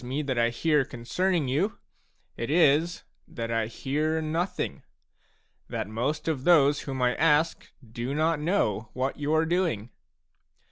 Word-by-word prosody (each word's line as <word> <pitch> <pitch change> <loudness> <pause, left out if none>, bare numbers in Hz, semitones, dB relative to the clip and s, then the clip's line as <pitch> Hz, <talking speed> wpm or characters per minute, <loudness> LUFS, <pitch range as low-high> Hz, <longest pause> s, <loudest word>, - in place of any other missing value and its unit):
me 135 +5 -2
that 130 -4 -1
I 115 0 +3
hear 150 +5 +2
concerning 145 +7 -1
you, 160 +12 0 0.6
it 115 - -4
is 165 +1 +3 0.2
that 115 -1 -5
I 115 -1 0
hear 150 +7 -1
nothing, 160 +4 -2 0.9
that - - -3
most 125 +10 -2
of 150 -5 -1
those 145 -4 +5
whom 135 -2 -3
I 125 0 +3
ask 160 +1 +2 0.2
do 120 +4 -4
not 160 0 +1
know 130 - 0
what 130 +3 -2
you 145 +1 -1
are 160 +1 +3
doing. 160 - -1
145 Hz, 145 wpm, -27 LUFS, 125-160 Hz, 0.9 s, those